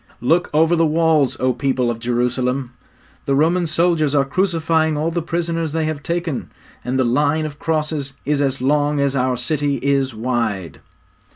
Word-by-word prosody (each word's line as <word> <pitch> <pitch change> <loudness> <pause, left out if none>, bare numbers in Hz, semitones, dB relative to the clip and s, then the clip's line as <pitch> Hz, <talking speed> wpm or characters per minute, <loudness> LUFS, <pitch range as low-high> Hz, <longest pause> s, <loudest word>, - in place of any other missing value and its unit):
'Look 165 +9 +2
over 160 +3 +3
the 165 - +2
walls, 160 -3 +2
O 130 0 +2
people 130 -2 0
of 115 - -6
Jerusalem; 125 +2 -1 0.5
the 140 - +1
Roman 170 +4 +2
soldiers 155 -2 +1
are 140 -1 +3
crucifying 160 -1 +1
all 160 +3 0
the 170 +1 -1
prisoners 165 -1 -2
they 160 -1 0
have 155 -2 -3
taken, 170 -2 -3 0.3
and 125 +1 -2
the 130 - +3
line 145 +5 +1
of 145 -1 -7
crosses 155 -3 -2
is 145 0 +1
as 135 -2 -1
long 145 +1 +2
as 140 -1 +1
our 130 -1 +1
city 145 +3 -1
is 135 -3 +1
wide!' 110 -6 -2
145 Hz, 170 wpm, -20 LUFS, 130-160 Hz, 0.5 s, over